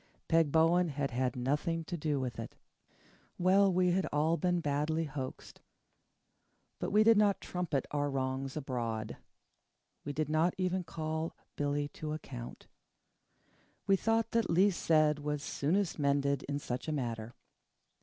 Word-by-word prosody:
Peg 165 -3 +3
Bowen 165 +3 +4
had 140 -2 -2
had 125 0 -1
nothing 150 +6 -1
to 175 - -5
do 150 -3 -1
with 125 -4 -4
it. - - -7 0.8
Well, 190 +2 +4
we 180 0 +3
had 185 +1 +1
all 155 +3 +2
been 180 0 +1
badly 150 +1 0
hoaxed. 135 -4 -7 1.2
But - - -2
we 210 +2 +5
did 225 0 +6
not 205 -2 +3
trumpet 175 -7 -2
our 145 -1 0
wrongs 135 +1 -2
abroad. 115 -6 -3 0.9
We 145 - -4
did 155 +1 -1
not 155 +3 +2
even 185 0 0
call 160 0 -4 0.2
Billy 145 0 -1
to 155 0 -5
account. 125 -6 -8 1.2
We 195 - +4
thought 225 +3 +1
that 230 -1 +1
least 185 +3 +3
said 155 -2 +3
was 150 0 -3
soonest 170 +6 0
mended 140 -1 +1
in 140 - 0
such 125 -2 -4
a - - -1
matter. 120 -5 -3
155 Hz, 145 wpm, -32 LUFS, 140-175 Hz, 1.2 s, did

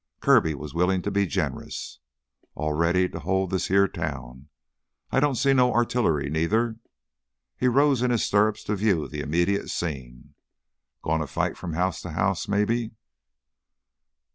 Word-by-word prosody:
Kirby 80 -1 +4
was 75 0 -8
willing 90 +2 +1
to 100 - -2
be 100 -1 +1
generous. 75 -7 -4 0.6
"All 75 0 -2
ready 85 +4 +2
to 85 - -7
hold 95 +3 -1
this 95 - -1
heah 100 +1 +4
town. 70 -5 -6 0.6
I - - +3
don't 145 -1 +2
see 135 +3 +3
no 125 -2 +4
artillery 110 - +1
neither." 110 +10 0 0.8
He 125 - 0
rose 135 0 +3
in 125 - +2
his 120 -2 +1
stirrups 105 +1 +2
to 105 - -1
view 95 -6 +1
the 75 -1 -5
immediate 85 +7 0
scene. 65 -7 -5 0.7
"Goin' 80 0 0
to 75 - -3
fight - - -2
from 85 -3 -6
house 90 +3 -1
to 90 - -7
house 95 +2 0
maybe 110 +3 0
95 Hz, 155 wpm, -25 LUFS, 80-110 Hz, 0.8 s, Kirby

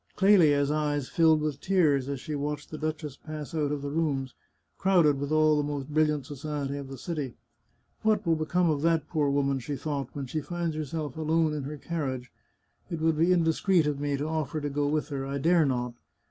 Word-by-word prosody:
Clelia's 155 -8 +5
eyes 145 -3 -1
filled 160 -2 +4
with 150 -2 -2
tears 150 -8 +2
as 140 -2 -3
she 155 +3 -6
watched 145 0 -3
the 155 - -5
duchess 155 -3 -4
pass 155 0 -7
out 150 -3 0
of 145 -1 -3
the 140 - -3
rooms, 140 -5 -1 0.5
crowded 170 -7 +4
with 145 +1 -3
all 155 0 +4
the 150 - +1
most 145 -1 -4
brilliant 150 -2 +1
society 145 0 -4
of 140 -1 -6
the 135 0 -8
city. 145 -3 -4 0.3
" - - -42
What 215 -2 +2
will 165 -1 +3
become 170 +3 +1
of 150 -3 +1
that 165 -1 +2
poor 150 -4 +1
woman," 140 -1 +1
she 135 +4 -4
thought, 140 -1 -3
" - - -31
when 140 -1 -4
she 155 +5 -3
finds 170 0 -3
herself 155 -2 -4
alone 160 0 +1
in 145 -3 -3
her 150 +2 -5
carriage? 135 -6 -4 0.6
It 170 - -3
would 160 0 +2
be 170 +3 +4
indiscreet 170 0 +3
of 145 -2 -1
me 145 -1 -1
to 145 - -2
offer 155 -1 -2
to 145 -1 -3
go 145 0 0
with 150 +1 -1
her. 140 -2 -3
I 135 +1 -3
dare 165 +1 +3
not. 125 -2 -1
150 Hz, 215 wpm, -28 LUFS, 140-160 Hz, 0.6 s, Clelia's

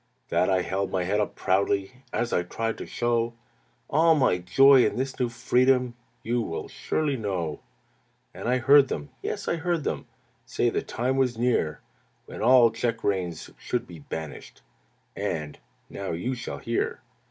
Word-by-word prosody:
"That 90 - +2
I 95 -1 +2
held 95 +1 -2
my 95 -1 -1
head 100 +4 0
up 105 - -1
proudly 100 +6 0
As 120 -1 -1
I - - +3
tried 115 +6 -3
to - - -6
show 120 -1 0 0.5
All 160 +2 +4
my 125 -11 +2
joy 130 +9 +6
in - - +1
this 130 +1 -3
new 125 -2 +1
freedom 125 +1 +2 0.3
You 120 +1 0
will 80 -7 -4
surely 145 -3 -1
know. 90 -8 -3 0.7
"And - - -4
I 125 - +3
heard 140 +2 +6
them, 75 - -5
Yes, - - -4
I 170 - 0
heard 170 -1 -1
them - - -3 0.4
Say - - 0
the - - -1
time 130 +3 -2
was 125 -3 +1
near 115 -10 0 0.4
When - - -8
all 120 0 +6
check 115 0 -2
reins 90 -5 -2
should 120 -1 -2
be 85 -6 -11
banished; 75 0 -8 0.5
And, 75 -2 -3 0.3
now 100 -3 -5
you 105 +11 -2
shall 125 0 -5
hear! 115 0 -2
115 Hz, 165 wpm, -26 LUFS, 95-130 Hz, 0.7 s, joy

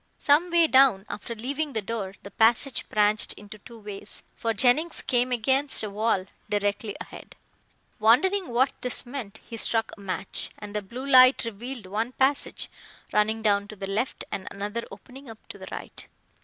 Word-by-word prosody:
Some 300 +5 +3
way 340 -1 +5
down, 260 -9 +5
after 210 +3 -6
leaving 280 +6 -3
the 220 - -1
door, 200 -3 -4
the 200 - -10
passage 235 +4 +2
branched 210 0 +3
into 210 +1 -12
two 230 +3 -13
ways, 205 -1 -7
for 230 - -1
Jennings 265 +9 +2
came 250 0 +1
against 265 +3 +3
a 210 - -4
wall 205 -2 0 0.2
directly 205 0 -1
ahead. - - -11 0.6
Wondering 360 - +3
what 250 +3 +2
this 250 0 +1
meant, 245 -5 -7
he 230 - -7
struck 225 0 +1
a - - -19
match, 195 0 -2
and 205 0 -9
the 210 - 0
blue 240 +7 -8
light 255 -2 +6
revealed 230 +1 -7
one 220 +6 -3
passage 275 +2 +1 0.5
running 220 +1 +1
down 200 -1 +2
to 215 - -9
the 195 - -6
left 210 +6 -2
and 190 - -5
another 210 +4 -4
opening 250 +6 -13
up 225 - -10
to - - -9
the - - -10
right. - - -8
225 Hz, 175 wpm, -26 LUFS, 205-260 Hz, 0.6 s, light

